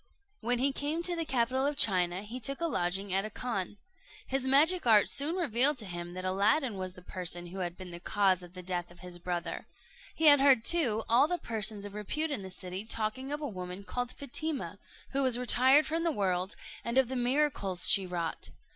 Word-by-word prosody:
When 245 +1 0
he 270 +3 +1
came 300 +5 -3
to 350 0 +4
the 330 -1 -2
capital 260 0 0
of 290 0 -3
China, 180 -2 +1
he 230 +4 -7
took 275 +3 -1
a 335 - -1
lodging 190 - -2
at 195 +1 +1
a 215 - -5
khan. 210 -4 -4 0.5
His 265 0 -1
magic 305 +4 +5
art 215 -3 +6
soon 295 +5 0
revealed 285 -4 +4
to 220 - -7
him 175 -1 -6
that 185 0 -5
Aladdin 210 +6 +1
was 185 -1 -6
the 180 - -14
person 175 -1 -4
who 180 +2 -8
had 175 -1 -4
been 185 -2 -9
the 170 - -8
cause 190 0 +1
of 175 0 -12
the 180 -1 -9
death 175 -1 -3
of 175 0 -16
his 180 -1 -9
brother. 175 -1 -4 0.5
He 320 - 0
had 290 -2 +8
heard, 265 -5 +5
too, 240 -11 +2
all 250 +6 +4
the 355 +2 -1
persons 215 - -2
of 205 - -8
repute 300 +10 -3
in 270 - -2
the 190 - -8
city 185 +1 -6
talking 225 +5 -3
of 295 +1 -2
a 295 - -3
woman 185 -2 -7
called 245 +4 -3
Fatima, 285 +2 -4 0.3
who 275 - +1
was 255 -3 +2
retired 260 +4 +5
from 325 +1 -2
the 335 - +1
world, 190 -6 -1 0.3
and 235 +2 -2
of 265 -2 +4
the 260 - -4
miracles 245 -8 +1
she 195 -2 +4
wrought. 170 -2 -4
220 Hz, 220 wpm, -30 LUFS, 185-275 Hz, 0.5 s, had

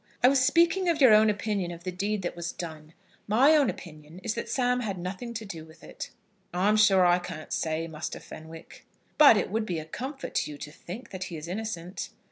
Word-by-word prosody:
"I 250 - +8
was 270 -1 +3
speaking 340 +6 +3
of 330 -2 +1
your 255 -6 +8
own 215 +1 +6
opinion 205 -3 -1
of 170 0 -8
the 185 - -3
deed 200 +2 -2
that 175 - -3
was 170 0 -4
done. 155 -2 -8 0.3
My 245 +8 +5
own 290 -3 +4
opinion 155 -1 -9
is 215 - -1
that 235 - -5
Sam 250 -1 +1
had 205 -6 -3
nothing 185 +7 -5
to 220 0 -4
do 165 -6 -7
with 160 0 -17
it." - - -8 0.5
"I'm 200 +4 +3
sure 195 -3 +5
I 175 0 +4
can't 175 -3 -7
say, 160 +1 -1
Muster 160 -1 -6
Fenwick." 160 +1 -12 0.3
"But 285 -7 +9
it 190 - -1
would 220 0 -1
be 175 - -2
a 155 - -5
comfort 265 - -6
to - - 0
you 145 - -8
to 150 - -8
think 185 - -9
that 185 -1 -5
he 170 - -6
is 155 +1 -8
innocent." 185 -2 -5
190 Hz, 225 wpm, -28 LUFS, 165-225 Hz, 0.5 s, But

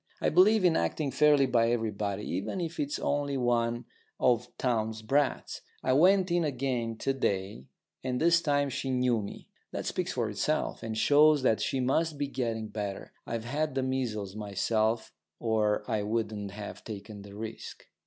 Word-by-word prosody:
I - - +2
believe 190 +5 +5
in 170 -2 +4
acting 150 -4 0
fairly 145 +1 +5
by 115 -3 +3
everybody, 105 -3 -1
even 95 - -3
if 170 -1 -4
it's 145 0 -1
only 145 -1 -1
one 120 -1 0 0.3
of 125 -1 +2
Townes' 110 -3 -1
brats. 140 +5 0 0.2
I 130 - +2
went 185 +5 +4
in 175 0 +2
again 125 -5 -2
to 135 - 0
day, 95 - -2 0.4
and 125 -1 -1
this 170 +1 +4
time 145 -2 +1
she 135 - -3
knew 125 -3 +2
me. 100 - -8 0.2
That - - -4
speaks - - -2
for - - 0
itself, - - -1
and 110 -1 -4
shows 150 +3 +5
that 110 -4 +3
she 135 - 0
must 145 +5 +1
be 145 - 0
getting 115 -5 -3
better. 105 -2 -5 0.2
I've 115 -1 -3
had 145 +3 -1
the 135 - +1
measles 115 -7 -2
myself 110 +2 0 0.3
or 110 -2 +1
I 110 -3 0
wouldn't 105 -1 -2
have 100 +1 -8
taken 105 -1 -8
the 100 0 -11
risk. 110 +1 -7
120 Hz, 170 wpm, -29 LUFS, 110-145 Hz, 0.4 s, believe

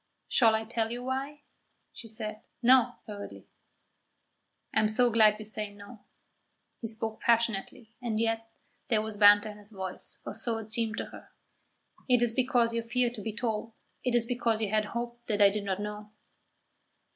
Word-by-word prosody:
"Shall 225 -3 +4
I 220 - -1
tell 225 0 -2
you 240 +1 -5
why?" 275 +3 -4 0.5
She 230 - -10
said 215 -1 -4 0.2
"No," 250 0 +5
hurriedly. 205 -1 -8 1.3
"I - - +3
am 215 - +3
so 240 +3 +4
glad 215 -2 +6
you 215 - -8
say 210 -1 -3
No." 205 +3 -13 0.8
He 230 - -4
spoke 220 0 -3
passionately, 230 -1 0
and 225 -3 -1
yet 225 0 -1 0.4
there 220 -5 +2
was 220 -1 -5
banter 205 +1 +7
in 210 - -13
his 205 +1 -7
voice, 190 -3 -6
or - - -5
so 225 +1 -1
it 220 -1 -2
seemed 225 -1 0
to - - -2
her. - - -12 0.8
"It 245 -1 +5
is 235 -2 +5
because 245 -2 +2
you 230 - 0
fear 240 +1 0
to 235 -4 -8
be 220 - -3
told; 225 0 -3 0.2
it 250 -1 +1
is 235 -1 +3
because 235 -2 0
you 215 -2 -1
had 215 0 +2
hoped 235 +2 -6
that 210 -2 0
I 200 -1 +7
did 205 0 -3
not 195 -1 -1
know." 210 0 -6
225 Hz, 180 wpm, -29 LUFS, 210-235 Hz, 1.3 s, banter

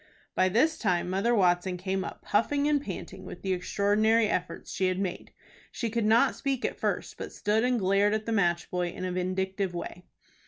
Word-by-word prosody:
By 185 0 +3
this 270 - +2
time 180 -3 0
Mother 200 +6 +2
Watson 180 -2 +2
came 190 +1 -2
up, - - -8
puffing 280 +7 +1
and 295 -2 +2
panting 190 -4 -7
with - - -9
the 190 -1 0
extraordinary 210 +4 +2
efforts 180 -3 -3
she 190 - 0
had 185 0 0
made 190 -2 -4 0.4
She 230 -3 -3
could 230 -1 0
not 230 +5 +4
speak 270 -2 -2
at - - -3
first, - - -2
but - - -5
stood 215 +1 0
and 250 0 +2
glared 200 +1 +3
at 215 0 -3
the 230 - -2
match 175 -5 +1
boy 180 -1 0
in 185 - -6
a 185 - -2
vindictive 185 +1 -2
way. 175 +1 -6
195 Hz, 200 wpm, -28 LUFS, 185-225 Hz, 0.4 s, not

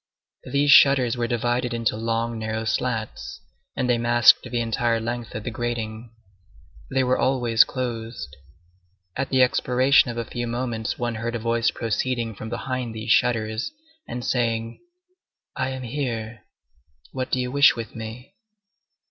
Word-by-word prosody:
These 145 +1 +2
shutters 130 -5 +6
were 120 -1 -1
divided 120 0 -1
into 115 -2 0
long, 115 +1 -2
narrow 110 0 -3
slats, 110 -1 -3 0.4
and 125 - -1
they 120 -1 +2
masked 120 0 +6
the 120 -1 -3
entire 115 0 0
length 120 0 -5
of 110 - -4
the 120 - -4
grating. 115 -1 -4 0.8
They 135 -1 +1
were 125 0 +1
always 120 -4 +4
closed. 115 - -5 0.8
At 135 +1 -2
the 130 -1 +4
expiration 130 +1 +3
of 120 - -5
a 115 - -2
few 120 +2 -4
moments 120 -2 -3
one 120 -1 -2
heard 120 0 -2
a - - 0
voice 115 +1 +1
proceeding 115 0 -2
from 110 +2 -8
behind 125 -1 -4
these 110 +1 -3
shutters, 110 - +1 0.3
and 120 0 -5
saying:— 115 -2 -1 0.8
"I 130 - -1
am 130 -1 -5
here. 115 -3 -4 0.7
What 130 -1 -4
do 130 - 0
you 125 0 -2
wish 140 +1 +6
with 115 -2 -7
me?" 115 +7 -8
120 Hz, 150 wpm, -24 LUFS, 115-125 Hz, 0.8 s, shutters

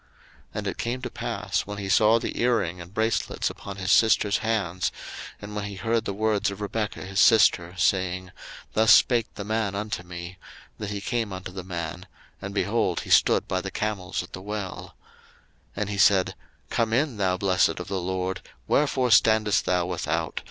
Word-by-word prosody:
01:024:030 - - -33 0.5
And - - -3
it - - -3
came 120 +2 -2
to 125 - -3
pass, - - -2
when 105 0 -5
he 100 -1 -4
saw 110 +3 +5
the - - -4
earring 110 -8 +1
and 85 +1 -11
bracelets 110 +2 0
upon 100 - -8
his 95 -1 -2
sister's 110 -2 +4
hands, 95 -6 -1 0.5
and 105 0 -8
when 105 -1 -3
he 100 0 -6
heard 115 +2 0
the 100 - -2
words 110 -1 +1
of 100 0 -7
Rebekah 105 -1 -3
his 100 +1 -2
sister, 95 -7 +5
saying, 95 -1 0 0.4
Thus 110 0 +4
spake 115 0 +5
the 100 - -5
man 105 -1 -1
unto 105 -1 -3
me; 85 +1 -9 0.4
that 105 -2 -4
he 100 -1 -4
came 115 -1 -2
unto 95 0 -6
the 95 0 -7
man; 85 0 -5 0.3
and, 95 - -5
behold, 100 -2 0
he - - -8
stood - - +4
by 95 0 -1
the 95 - -5
camels 95 -3 -3
at 90 - -14
the 95 - -6
well. 100 -1 -6 0.8
01:024:031 - - -2
And 105 - -1
he 100 - -3
said, 95 -2 +4 0.4
Come 115 -1 +1
in, 135 -1 +1
thou 95 -2 +1
blessed 95 -2 +2
of 90 - -6
the 95 -2 -2
LORD; 95 +1 -2 0.3
wherefore 130 -4 +2
standest 110 -1 +4
thou 90 -1 +1
without? 90 -1 -2
100 Hz, 190 wpm, -25 LUFS, 95-110 Hz, 0.8 s, saw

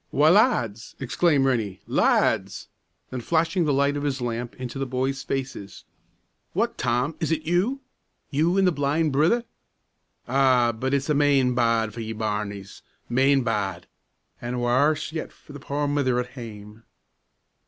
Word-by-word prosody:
"Why, 150 +3 +4
lads!" 120 - +2
exclaimed 140 +2 +2
Rennie; 110 -8 0
"lads!" - - +1 0.4
Then, 130 -1 -4
flashing 165 +5 +1
the 150 - +1
light 140 +1 +2
of 145 - -2
his 140 -2 -2
lamp 120 0 -4
into 130 +1 -6
the 135 - -2
boys' 130 +2 -2
faces, 130 -7 -5 0.7
"What, - - 0
Tom, 125 +6 0
is 160 - -1
it 155 -1 0
you? 190 - 0 0.5
you 160 +6 +2
and 195 - +4
the 180 - +4
blind 150 +1 0
brither? 160 - +2 0.8
Ah! 130 -2 +3
but 130 +5 -1
it's 140 0 -1
main 140 -3 +3
bad 115 -3 +1
for 115 - -8
ye, 110 0 -4
bairnies, 105 -2 -4 0.3
main 135 +2 +3
bad 100 -6 -2 0.6
an' 120 +1 -3
warse 130 +7 +1
yet 160 0 -5
for 145 - -16
the 145 - -8
poor 145 +1 -2
mither 140 -4 +1
at 125 0 -3
hame." 110 -4 -10
135 Hz, 155 wpm, -24 LUFS, 120-145 Hz, 0.8 s, Why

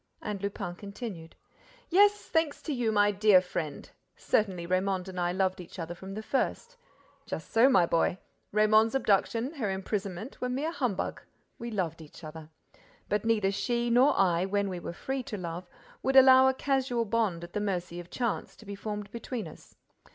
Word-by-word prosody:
And 205 -2 -5
Lupin 200 -3 -4
continued: 200 -3 -8 0.6
"Yes, 410 +3 +5
thanks 320 -3 0
to 305 - -2
you, 240 -4 0
my 205 -1 +4
dear 205 -1 +6
friend. 165 -5 -5 0.3
Certainly, 190 -5 0
Raymonde 185 +1 0
and 185 -1 -6
I 175 0 +1
loved 185 0 0
each 175 - -12
other 170 -1 -4
from 190 +3 -9
the 215 - -5
first. 470 - -2 0.5
Just - - -6
so, 230 +4 +6
my 190 -10 +5
boy—Raymonde's 215 +6 +1
abduction, 230 - +1
her 240 -10 -2
imprisonment, 195 +3 -4
were 250 - -1
mere 280 +6 -1
humbug: 250 - -2 0.4
we 235 - -5
loved 175 -7 -2
each 155 +2 -14
other. 155 0 -9 0.6
But 210 +1 0
neither 215 -4 +2
she 235 +4 -1
nor 255 +4 +4
I, 180 -3 +3
when 200 0 0
we 180 -2 -4
were - - -5
free 265 +9 -3
to 220 -3 -6
love, 175 0 -6 0.3
would 265 0 0
allow 260 0 +8
a 265 - +2
casual 260 -4 0
bond 200 -6 0
at 175 - -10
the 210 - -1
mercy 180 -4 -3
of 175 0 -10
chance, 235 -4 -2
to 220 - -16
be 200 - -6
formed 210 0 -5
between 235 0 -5
us. - - -14
205 Hz, 180 wpm, -29 LUFS, 180-240 Hz, 0.6 s, allow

